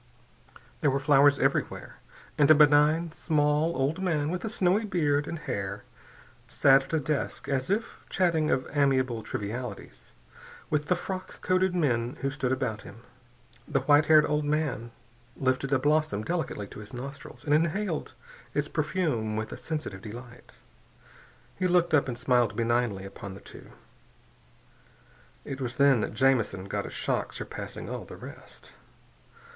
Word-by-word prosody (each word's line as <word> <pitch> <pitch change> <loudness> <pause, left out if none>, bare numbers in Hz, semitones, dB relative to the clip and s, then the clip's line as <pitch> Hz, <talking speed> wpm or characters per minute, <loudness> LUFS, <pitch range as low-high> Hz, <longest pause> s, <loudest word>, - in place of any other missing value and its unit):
There 145 - +2
were 135 +1 +1
flowers 145 0 +5
everywhere, - - -1 0.4
and 145 -2 +4
a 155 - +9
benign, 150 +3 +4
small 150 0 +1
old 140 +7 0
man 155 -5 0
with 180 0 -3
a 220 - -2
snowy 200 0 +2
beard 150 -8 +1
and 170 - -4
hair, 100 -9 -4 0.6
sat 135 -1 +4
at 135 - -11
a 160 - +3
desk 150 0 -3
as 130 -2 -1
if 210 +4 -1
chatting 165 -4 +1
of 130 - 0
amiable 130 -5 +2
trivialities 105 +1 -6 0.6
with 150 -1 0
the 180 - +3
frock 185 +1 -6
coated 185 0 +2
men 125 -7 0
who 135 +1 -1
stood 135 -2 -2
about 125 -5 -1
him. 115 +4 -13 0.6
The 140 -3 0
white 145 +3 +4
haired 155 -1 +7
old 150 0 0
man 145 -5 -1 0.5
lifted 130 +1 0
a 135 - +4
blossom 145 -6 +1
delicately 160 -9 -3
to - - -10
his 105 +3 -10
nostrils 140 +4 -9
and 145 - +2
inhaled 170 +3 0 0.4
its 145 0 0
perfume 150 -10 -1
with 110 0 -3
a - - -5
sensitive 150 -12 -5
delight. 120 +3 -10 1.1
He 185 - +2
looked 175 -2 +2
up 145 -3 +4
and 120 -2 -4
smiled 125 -1 +2
benignly 115 -4 0
upon 100 0 -8
the - - -10
two. - - -13 1.8
It 135 0 -6
was 120 -1 -3
then 140 -2 +5
that 105 - -3
Jamison 115 -6 +2
got 100 - -3
a - - -6
shock - - -2
surpassing - - -7
all - - -5
the - - -10
rest. - - -12
145 Hz, 155 wpm, -28 LUFS, 125-155 Hz, 1.8 s, a